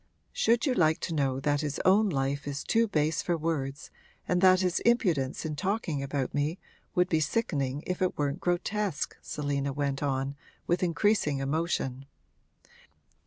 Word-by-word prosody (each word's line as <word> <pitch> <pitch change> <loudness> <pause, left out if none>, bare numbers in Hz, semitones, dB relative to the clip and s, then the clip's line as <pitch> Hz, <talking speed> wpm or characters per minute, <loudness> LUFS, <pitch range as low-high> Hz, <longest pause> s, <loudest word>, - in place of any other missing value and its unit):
'Should 230 +1 +2
you 265 - +2
like 160 -7 +3
to 170 - -3
know 135 -3 0
that 145 +1 +1
his 145 -2 -3
own 205 +3 +5
life 140 -2 -1
is 140 -1 -3
too 230 0 +2
base 155 -4 +1
for 175 -1 0
words 150 -3 -3 0.4
and 180 0 +1
that 185 -1 +6
his 180 -1 +1
impudence 175 - +1
in 155 -1 -3
talking 185 -4 -1
about 140 -1 -2
me 145 +4 0 0.4
would 180 0 +3
be 160 -4 +2
sickening 145 - -1
if 180 0 -3
it 185 - 0
weren't 145 +2 -1
grotesque?' 180 -1 -1
Selina 140 -1 -2
went 140 0 -2
on, 135 -1 -1 0.3
with 175 +1 +1
increasing 180 -3 +2
emotion. 135 -2 -2
155 Hz, 160 wpm, -29 LUFS, 140-185 Hz, 0.4 s, that